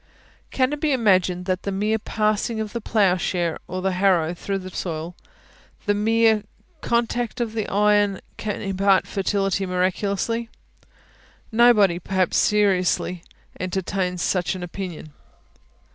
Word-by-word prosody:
Can 260 +2 +1
it 295 - -4
be 300 -3 +2
imagined 185 -6 +2
that 185 -1 -1
the 200 - -3
mere 210 +3 0
passing 215 +1 -1
of 215 -1 -4
the 235 - -3
ploughshare 180 -5 +1
or 185 +1 -4
the 190 - +1
harrow 180 -3 +2
through 195 +3 -3
the 185 -1 -8
soil 170 -1 -4 0.7
the 205 - +2
mere 220 +1 +3 0.4
contact 235 0 -1
of 230 -2 -2
the 220 -2 -2
iron 205 -1 +3 0.2
can 210 -1 -4
impart 195 0 +2
fertility 195 0 -1
miraculously? 195 +5 -1 1.0
Nobody, 220 -6 +5
perhaps, 185 0 0
seriously 185 -3 +2 0.4
entertains 185 -1 -2
such 180 -1 0
an 180 - -6
opinion. 175 -4 -7
195 Hz, 130 wpm, -23 LUFS, 185-215 Hz, 1.0 s, Nobody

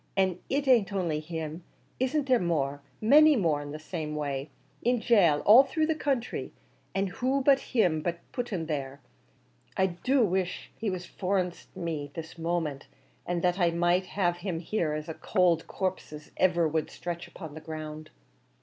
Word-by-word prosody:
an' 185 -2 +2
it 280 +1 0
an't 235 -6 +4
only 175 -6 -1
him; 160 +1 -5 0.4
isn't 265 +3 +1
there 255 -3 +4
more? 145 -5 -1 0.2
many 300 +7 +7
more 165 - +1
in 145 0 -7
the 150 - -5
same 155 -1 -5
way, 140 -1 -3 0.3
in 245 +1 +2
gaol 185 -11 +4
all 225 +5 +9
through 310 +4 0
the 320 - +1
counthry; 275 -6 -2 0.4
an' 195 0 +2
who 255 +8 0
but 275 0 +5
him 180 - +1 0.3
put 245 -2 -3
'em 175 -5 -2
there? 140 -3 -4 0.8
I 190 - +4
do 230 +8 +2
wish 185 -1 -2
he 220 - -2
was 180 -1 -4
for 190 +2 -1
a 185 - +3
nens't 180 -1 -10
me 155 -4 -3
this 165 +1 -8
moment, 160 -4 -2 0.4
an' 175 -1 -1
that 180 +2 +1
I 175 -2 +4
might 175 +3 0
lave 175 -3 +2
him 175 -2 -3
here 170 -3 -1
as 155 0 -3
cowld 170 +1 +1
a - - -19
corpse 185 -3 -3
as 150 0 -10
iver 175 -3 +3
wor 155 0 -1
stretched 170 -1 -6
upon 160 -5 -9
the 155 - -9
ground!" 155 -1 -7
175 Hz, 180 wpm, -28 LUFS, 155-210 Hz, 0.8 s, all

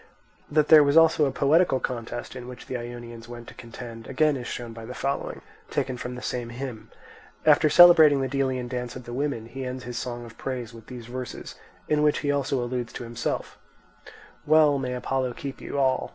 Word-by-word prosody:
That 150 0 +2
there 155 -2 +9
was 140 +2 +3
also 165 -2 +6
a 135 - 0
poetical 145 0 +3
contest 120 -1 -5
in 125 -1 -8
which 125 -1 -10
the 130 - -5
Ionians 120 -1 -7
went 120 -1 -9
to - - -12
contend, 115 -1 -10
again 150 +2 +2
is 125 -2 -5
shown 120 -2 -6
by 115 0 -9
the 125 +3 -8
following, 140 0 -3 0.3
taken 130 - -1
from 125 0 -6
the 125 - -8
same 120 -2 -3
hymn. 120 -2 -7 0.6
After 155 0 +5
celebrating 160 -3 +8
the 135 - 0
Delian 130 -2 -1
dance 125 -1 -4
of 130 - -8
the 120 - -8
women, 135 -4 -2
he 130 +3 -7
ends 130 0 -5
his 120 0 -5
song 120 -1 -5
of 115 0 -14
praise 125 -3 -4
with 115 -1 -13
these 125 -2 -9
verses, 125 +1 -7 0.3
in 150 -1 +2
which 150 -1 +2
he 145 - +2
also 135 -2 0
alludes 120 -1 -3
to - - -6
himself: 115 0 -4 0.9
Well, 150 -2 +5
may 125 -1 -3
Apollo 130 0 -1
keep 135 +2 -7
you - - -5
all! 130 -2 +1
125 Hz, 205 wpm, -26 LUFS, 120-140 Hz, 0.9 s, there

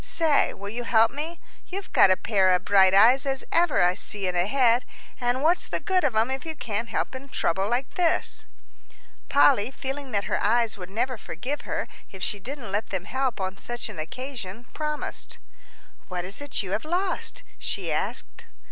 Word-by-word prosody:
Say, 315 -4 +3
will 200 +1 -7
you 240 +2 -4
help 225 -1 +4
me? 320 +4 -5 0.3
You've 390 +1 -6
got - - +7
a 185 - +4
pair 195 -4 +2
of 180 - -2
bright 190 -1 +6
eyes 240 +6 +6
as 270 -1 -2
ever 335 - +3
I 180 0 +4
see 200 +1 -2
in 180 -1 -1
a 175 +2 +2
head; 245 0 +3 0.4
and 245 +2 0
what's 340 +3 +2
the - - -1
good 375 -2 +1
of 265 -6 +1
'em 225 +4 +2
if 265 0 -3
you 320 -1 -5
can't 230 -3 -3
help - - -2
in 270 +1 -8
trouble 190 -3 0
like 245 +3 -1
this?" 345 -2 +1 0.8
Polly, 275 -6 +5
feeling 270 +1 -5
that 200 -4 0
her - - -1
eyes 230 +1 +2
would 180 -3 -9
never 235 +4 -2
forgive 260 - -5
her - - -2 0.2
if 190 -1 -9
she 205 - +1
didn't 245 0 -6
let 210 +3 -1
them 190 -1 -3
help 260 0 -1
on 190 0 -3
such 240 +1 -3
an 210 - -8
occasion, 225 - -6
promised. 300 -1 -4 0.7
"What 180 -1 -4
is 195 +8 -2
it 285 -6 -1
you 185 - -6
have 210 +3 -1
lost?" 370 +8 -2 0.2
she - - -2
asked. - - -3
240 Hz, 195 wpm, -26 LUFS, 200-275 Hz, 0.8 s, got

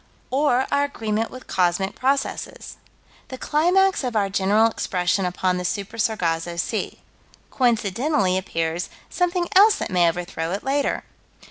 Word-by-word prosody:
Or 265 -1 +2
our 285 0 +2
agreement 225 -5 -2
with 255 - -11
cosmic 185 +1 0
processes. 270 +1 -2 0.5
The 260 - -7
climax 360 +6 +2
of 245 -3 -3
our 200 -2 +1
general 200 +3 +3
expression 185 -4 0
upon 180 0 0
the 180 - -3
Super 200 +4 -4
Sargasso 175 -6 -1
Sea. - - -3 0.5
Coincidentally 230 -3 +1
appears 165 -2 -2 0.2
something 355 -1 0
else 410 +3 +7
that - - -4
may 175 -2 +4
overthrow 175 -1 -4
it 200 - -4
later. 275 +1 0
215 Hz, 135 wpm, -23 LUFS, 180-270 Hz, 0.5 s, else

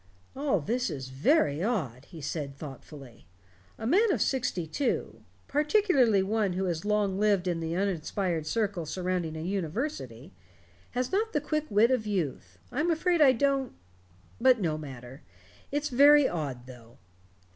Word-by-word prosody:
"All 270 - 0
this 245 - -1
is 130 -2 -6
very 145 - +2
odd," 155 - -2
he 165 -4 -11
said 145 -1 -4
thoughtfully. 135 - -11 0.5
"A 220 - -6
man 400 - +4
of - - 0
sixty 250 -10 0
two 250 - -2 0.3
particularly 295 - +3
one 205 -1 0
who 190 +2 -1
has 170 -2 -2
long 205 -2 0
lived 205 -3 +2
in 175 -2 0
the 165 0 -3
uninspired 180 -3 -1
circle 200 -7 -1
surrounding 180 -2 -2
a - - -5
university 165 - -4 0.6
has 250 0 -1
not 435 +3 0
the 295 - +2
quick 305 +1 -2
wit 215 +4 +4
of 235 -4 0
youth. 140 - -3
I'm 300 +7 0
afraid 340 +1 +1
I 275 -3 +8
don't 275 +1 0 0.7
but 255 0 +5
no 165 -6 0
matter. 135 -2 -9 0.5
It's 290 +1 -1
very 285 +2 +6
odd, 140 -7 -4
though." 120 -2 -14
195 Hz, 150 wpm, -28 LUFS, -, 0.7 s, I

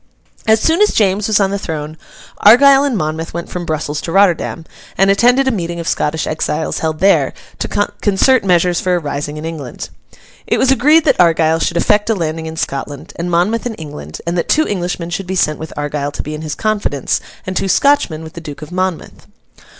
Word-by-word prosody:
As 220 0 +5
soon 325 - +2
as 420 - +4
James 200 -1 +2
was 215 -1 +2
on 195 -1 +1
the 200 - -2
throne, 155 -4 -5 0.4
Argyle 270 +5 +7
and 275 -6 0
Monmouth 160 0 -3
went 170 - -5
from 175 -1 -5
Brussels 150 -1 -2
to 165 - -5
Rotterdam, 175 -3 +2 0.3
and 195 +1 +4
attended 245 +6 +3
a - - +3
meeting 170 -5 -3
of 165 - -5
Scottish 155 -3 -1
exiles 155 0 -2
held 160 -1 -2
there, 195 +1 +3 0.3
to - - -2
concert 205 +4 +1
measures 180 -2 +2
for 180 -1 +1
a - - +1
rising 145 -1 -4
in 155 - -6
England. 155 -7 -6 0.6
It - - +1
was 265 - +3
agreed 300 +5 +4
that - - +2
Argyle 165 -1 +3
should 170 - -1
effect 210 +5 +2
a 225 - +2
landing 160 -2 -3
in 160 0 -7
Scotland, 140 -1 -4
and 170 +1 -3
Monmouth 195 +8 +1
in 230 - -5
England; 80 - -9
and 170 +1 -2
that - - -3
two 310 +1 +3
Englishmen 175 -3 -3
should 175 +2 -4
be 190 - -3
sent 155 -4 +1
with 160 - -7
Argyle 145 -1 -3
to - - -5
be 150 - -6
in 155 - -6
his 155 -1 -4
confidence, 205 -10 -1 0.2
and 185 - -4
two 195 - 0
Scotchmen 190 - +2
with 160 - -10
the 170 - -8
Duke 150 -2 -8
of 155 - -10
Monmouth. 185 -1 -4
175 Hz, 210 wpm, -16 LUFS, 155-205 Hz, 0.6 s, Argyle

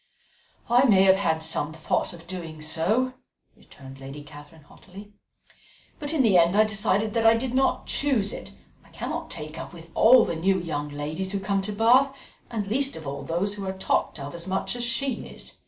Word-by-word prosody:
"I 245 +3 +5
may 195 -6 +5
have 190 0 +6
had 160 -5 0
some 160 -1 -2
thoughts 160 -1 -1
of 170 -2 -12
doing 170 -3 -7
so," 185 +12 0 0.4
returned 135 -1 -14
Lady 135 +2 -9
Catherine 145 +1 -14
haughtily; 200 +7 -14 0.9
"but 290 -2 -2
in 310 -5 +2
the 200 -6 +5
end 170 +3 +3
I 215 - +6
decided 215 0 +1
that 230 - +1
I 225 - +7
did 250 +1 -3
not 265 +1 +1
choose 255 -8 0
it; - - -8 0.3
I - - -22
cannot - - -5
take 155 +1 -6
up - - -8
with 165 -1 -13
all 245 +1 +6
the - - -3
new 190 +4 +1
young 150 -4 -4
ladies 155 +7 -4
who 200 - -1
come 195 0 0
to 205 +2 -4
Bath, 250 +6 +3 0.3
and 215 -3 -3
least 270 +7 0
of 160 - -9
all 140 0 -5
those 175 +7 -1
who 200 -2 -6
are 190 0 -4
talked 190 - -1
of 140 +1 -7
as 170 +1 -6
much 190 +5 -2
as 240 - -3
she 260 +3 -2
is. - - -10
190 Hz, 205 wpm, -25 LUFS, 160-225 Hz, 0.9 s, I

